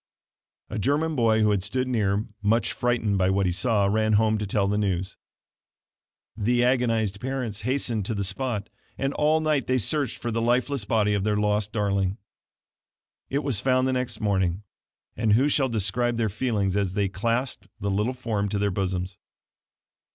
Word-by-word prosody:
A 110 Hz, -, -3 dB
German 150 Hz, +7 st, +1 dB
boy 115 Hz, -3 st, +3 dB
who 105 Hz, -1 st, +4 dB
had 100 Hz, -2 st, +1 dB
stood 125 Hz, +7 st, -2 dB
near, 105 Hz, -4 st, 0 dB, 0.2 s
much 110 Hz, +3 st, +1 dB
frightened 115 Hz, -5 st, 0 dB
by 95 Hz, 0 st, +3 dB
what 95 Hz, 0 st, +1 dB
he 90 Hz, -, +1 dB
saw, 105 Hz, +2 st, +2 dB
ran 110 Hz, +2 st, +2 dB
home 110 Hz, 0 st, +3 dB
to 105 Hz, -, -3 dB
tell 100 Hz, 0 st, +1 dB
the 100 Hz, -, 0 dB
news. 95 Hz, -3 st, -1 dB, 1.2 s
The 120 Hz, +3 st, +1 dB
agonized 115 Hz, -5 st, +1 dB
parents 125 Hz, -5 st, -3 dB
hastened 120 Hz, -4 st, -1 dB
to 110 Hz, -, -2 dB
the 100 Hz, -, -1 dB
spot, 105 Hz, +1 st, -2 dB, 0.3 s
and 135 Hz, +1 st, -1 dB
all 155 Hz, +1 st, +2 dB
night 155 Hz, -4 st, 0 dB
they 130 Hz, -, +2 dB
searched 135 Hz, +3 st, -1 dB
for 120 Hz, -, -4 dB
the 115 Hz, +1 st, -1 dB
lifeless 125 Hz, +1 st, +1 dB
body 105 Hz, 0 st, +2 dB
of 100 Hz, -2 st, 0 dB
their 105 Hz, 0 st, +1 dB
lost 105 Hz, 0 st, +1 dB
darling. 100 Hz, -2 st, 0 dB, 1.1 s
It 140 Hz, +2 st, -1 dB
was 135 Hz, -8 st, -1 dB
found 130 Hz, +2 st, +2 dB
the 130 Hz, -, +1 dB
next 125 Hz, -3 st, -2 dB
morning; 95 Hz, -2 st, 0 dB, 0.5 s
and 110 Hz, -1 st, +2 dB
who 130 Hz, +6 st, +4 dB
shall 140 Hz, -2 st, +2 dB
describe 115 Hz, +2 st, 0 dB
their 115 Hz, -2 st, +1 dB
feelings 105 Hz, -3 st, -1 dB
as 100 Hz, -3 st, 0 dB
they 100 Hz, 0 st, +1 dB
clasped 115 Hz, +2 st, -2 dB
the 100 Hz, 0 st, -2 dB
little 105 Hz, +6 st, 0 dB
form 110 Hz, -5 st, -2 dB
to 105 Hz, -, -1 dB
their 100 Hz, 0 st, +1 dB
bosoms? 90 Hz, -1 st, -2 dB
110 Hz, 180 wpm, -25 LUFS, 100-125 Hz, 1.2 s, who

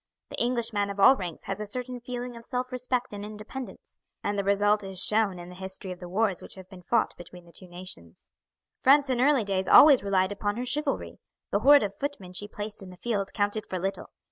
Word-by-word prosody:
The -, -, -3 dB
Englishman 230 Hz, -4 st, 0 dB
of 200 Hz, 0 st, -6 dB
all 260 Hz, +7 st, +8 dB
ranks 175 Hz, -8 st, -6 dB
has 195 Hz, +2 st, -5 dB
a 210 Hz, -, -5 dB
certain 250 Hz, +3 st, -5 dB
feeling 245 Hz, 0 st, -6 dB
of 230 Hz, -, -11 dB
self 250 Hz, +2 st, -4 dB
respect 250 Hz, -1 st, -2 dB
and 205 Hz, 0 st, -6 dB
independence, 215 Hz, +5 st, -9 dB, 0.2 s
and 205 Hz, -, -1 dB
the 200 Hz, -, -1 dB
result 205 Hz, +1 st, +2 dB
is 190 Hz, -1 st, -2 dB
shown 210 Hz, -2 st, +5 dB
in 175 Hz, 0 st, -9 dB
the -, -, -10 dB
history 190 Hz, +1 st, -4 dB
of 180 Hz, -, -8 dB
the 180 Hz, -, -9 dB
wars 200 Hz, 0 st, 0 dB
which -, -, -8 dB
have 190 Hz, -1 st, -12 dB
been 185 Hz, -1 st, -13 dB
fought 220 Hz, +6 st, 0 dB
between 175 Hz, 0 st, -13 dB
the 170 Hz, -, -17 dB
two 185 Hz, -, -10 dB
nations. 175 Hz, -, -8 dB, 0.5 s
"France 275 Hz, 0 st, +4 dB
in 245 Hz, -1 st, 0 dB
early 275 Hz, -3 st, +4 dB
days 190 Hz, -2 st, -1 dB
always 285 Hz, +3 st, +8 dB
relied 190 Hz, -1 st, +1 dB
upon 205 Hz, +1 st, -2 dB
her 245 Hz, -, -3 dB
chivalry. 280 Hz, +3 st, -1 dB, 0.3 s
The 200 Hz, -, +2 dB
horde 285 Hz, +4 st, +6 dB
of 200 Hz, -1 st, -3 dB
footmen 200 Hz, -8 st, -6 dB
she 205 Hz, +3 st, -5 dB
placed 210 Hz, 0 st, -5 dB
in 190 Hz, -, -10 dB
the 180 Hz, -, -13 dB
field 200 Hz, -2 st, -2 dB
counted 205 Hz, +1 st, -1 dB
for 185 Hz, -, -4 dB
little. 195 Hz, +2 st, -4 dB
205 Hz, 225 wpm, -27 LUFS, 190-245 Hz, 0.5 s, all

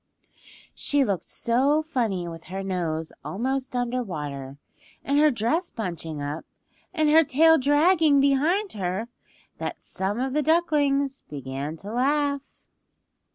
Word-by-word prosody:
She 285 Hz, -1 st, +1 dB
looked 195 Hz, -8 st, -1 dB
so 275 Hz, +6 st, +1 dB
funny 225 Hz, -, -1 dB
with 165 Hz, -1 st, -8 dB
her 195 Hz, +1 st, -5 dB
nose 165 Hz, -4 st, -2 dB
almost 260 Hz, +5 st, -2 dB
under 245 Hz, +1 st, 0 dB
water 145 Hz, -, -6 dB, 0.5 s
and 280 Hz, +1 st, +2 dB
her 305 Hz, 0 st, +6 dB
dress 295 Hz, -, 0 dB
bunching 165 Hz, -7 st, -5 dB
up, 145 Hz, +2 st, -4 dB, 0.5 s
and 315 Hz, -4 st, +1 dB
her 320 Hz, +1 st, +7 dB
tail 320 Hz, +3 st, +5 dB
dragging 295 Hz, +2 st, +4 dB
behind 305 Hz, +9 st, +2 dB
her, 195 Hz, +3 st, -3 dB, 0.5 s
that -, -, -5 dB
some 195 Hz, +4 st, -3 dB
of 260 Hz, 0 st, -1 dB
the 300 Hz, -, +2 dB
ducklings 285 Hz, -4 st, +1 dB
began 140 Hz, +2 st, -5 dB
to 205 Hz, +6 st, -8 dB
laugh. 280 Hz, +2 st, +1 dB
255 Hz, 130 wpm, -25 LUFS, 180-290 Hz, 0.5 s, her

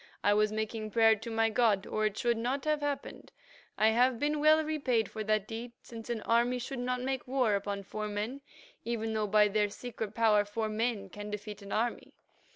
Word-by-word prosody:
I 205 Hz, -, +4 dB
was 210 Hz, 0 st, +3 dB
making 220 Hz, 0 st, -3 dB
prayer 225 Hz, 0 st, +5 dB
to 225 Hz, +2 st, -8 dB
my 225 Hz, 0 st, +1 dB
god, 215 Hz, -4 st, +2 dB
or 215 Hz, 0 st, 0 dB
it 210 Hz, -, -6 dB
should 240 Hz, -1 st, +1 dB
not 255 Hz, +5 st, -2 dB
have 305 Hz, -1 st, +1 dB
happened. 290 Hz, -1 st, -4 dB, 0.5 s
I 215 Hz, +1 st, +5 dB
have 245 Hz, +2 st, +3 dB
been 295 Hz, +4 st, 0 dB
well 310 Hz, +1 st, +5 dB
repaid 270 Hz, -8 st, 0 dB
for 220 Hz, -, -4 dB
that 215 Hz, -1 st, +1 dB
deed, 235 Hz, +2 st, -6 dB
since 230 Hz, 0 st, -10 dB
an 230 Hz, -3 st, -2 dB
army 240 Hz, +2 st, +2 dB
should 255 Hz, +1 st, -5 dB
not 250 Hz, 0 st, -2 dB
make 265 Hz, -1 st, -3 dB
war 250 Hz, -4 st, +2 dB
upon 200 Hz, 0 st, -2 dB
four 215 Hz, +2 st, -4 dB
men, 210 Hz, +7 st, -4 dB, 0.4 s
even 225 Hz, -1 st, -2 dB
though 215 Hz, -1 st, 0 dB
by 210 Hz, +1 st, +5 dB
their 210 Hz, 0 st, +1 dB
secret 220 Hz, -1 st, -6 dB
power 215 Hz, -3 st, +4 dB
four 215 Hz, +2 st, -3 dB
men 215 Hz, -2 st, -1 dB
can 205 Hz, +2 st, -8 dB
defeat 210 Hz, 0 st, -6 dB
an 200 Hz, -, -10 dB
army. 235 Hz, +2 st, -2 dB
225 Hz, 205 wpm, -31 LUFS, 210-245 Hz, 0.5 s, prayer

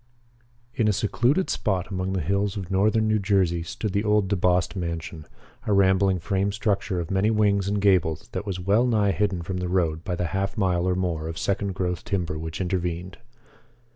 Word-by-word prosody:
] 120 Hz, 0 st, -36 dB
In 110 Hz, -1 st, +1 dB
a 105 Hz, -, +3 dB
secluded 120 Hz, -, +1 dB
spot 95 Hz, -3 st, -1 dB
among 95 Hz, 0 st, -2 dB
the 95 Hz, -, -1 dB
hills 100 Hz, +1 st, 0 dB
of 95 Hz, -2 st, -6 dB
northern 110 Hz, +3 st, +2 dB
New 110 Hz, 0 st, +2 dB
Jersey 95 Hz, -4 st, +1 dB
stood 95 Hz, +4 st, -4 dB
the 100 Hz, 0 st, +1 dB
old 105 Hz, -2 st, +2 dB
DeBost 90 Hz, -1 st, +1 dB
mansion, 85 Hz, -3 st, -5 dB, 0.4 s
a 105 Hz, -, +2 dB
rambling 95 Hz, -1 st, +3 dB
frame 95 Hz, +3 st, -1 dB
structure 100 Hz, -2 st, -1 dB
of 85 Hz, +1 st, -4 dB
many 95 Hz, +3 st, +2 dB
wings 100 Hz, -3 st, +2 dB
and 100 Hz, +1 st, 0 dB
gables 90 Hz, -6 st, +2 dB
that 100 Hz, +2 st, -5 dB
was 95 Hz, -2 st, -3 dB
well 100 Hz, +7 st, +2 dB
nigh 105 Hz, -4 st, +2 dB
hidden 95 Hz, -3 st, -1 dB
from 90 Hz, +2 st, -4 dB
the 90 Hz, 0 st, -3 dB
road 85 Hz, -3 st, 0 dB
by 90 Hz, -, -2 dB
the 90 Hz, -, -2 dB
half 100 Hz, +1 st, -2 dB
mile 90 Hz, -3 st, +1 dB
or 90 Hz, -, +1 dB
more 85 Hz, -4 st, -2 dB
of 80 Hz, 0 st, -5 dB
second 100 Hz, -1 st, -1 dB
growth 90 Hz, -2 st, -2 dB
timber 90 Hz, -7 st, -2 dB
which 80 Hz, 0 st, -5 dB
intervened. 90 Hz, -1 st, -3 dB
95 Hz, 200 wpm, -25 LUFS, 90-105 Hz, 0.4 s, a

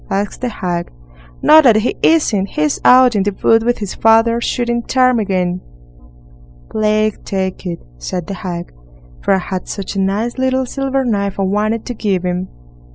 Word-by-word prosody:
asked 200 Hz, +1 st, -2 dB
the 250 Hz, -, -1 dB
hag. 175 Hz, -5 st, -3 dB, 0.5 s
"No, 315 Hz, +1 st, +8 dB
that 245 Hz, -7 st, +5 dB
he 215 Hz, +3 st, +1 dB
isn't. 225 Hz, -12 st, +2 dB
He's 300 Hz, +5 st, -1 dB
out 250 Hz, -2 st, +6 dB
in 205 Hz, -, +2 dB
the 200 Hz, 0 st, -1 dB
wood 225 Hz, 0 st, +5 dB
with 240 Hz, +2 st, 0 dB
his 205 Hz, -3 st, -5 dB
father, 225 Hz, +1 st, +3 dB
shooting 240 Hz, 0 st, -1 dB
ptarmigan." 200 Hz, -9 st, +1 dB, 1.1 s
"Plague 215 Hz, 0 st, 0 dB
take 190 Hz, -1 st, -3 dB
it", 170 Hz, -1 st, -3 dB, 0.2 s
said 180 Hz, -, -4 dB
the 200 Hz, -, -5 dB
hag, 180 Hz, -3 st, -6 dB, 0.5 s
"for -, -, +2 dB
I -, -, +1 dB
had 185 Hz, 0 st, -5 dB
such 200 Hz, 0 st, -5 dB
a -, -, -1 dB
nice 210 Hz, +6 st, -1 dB
little 260 Hz, 0 st, +1 dB
silver 270 Hz, +1 st, -2 dB
knife 200 Hz, -4 st, -1 dB
I -, -, +1 dB
wanted 210 Hz, +3 st, -1 dB
to 245 Hz, -, -4 dB
give 200 Hz, -5 st, -1 dB
him." 180 Hz, +1 st, -2 dB
215 Hz, 170 wpm, -16 LUFS, 190-240 Hz, 1.1 s, No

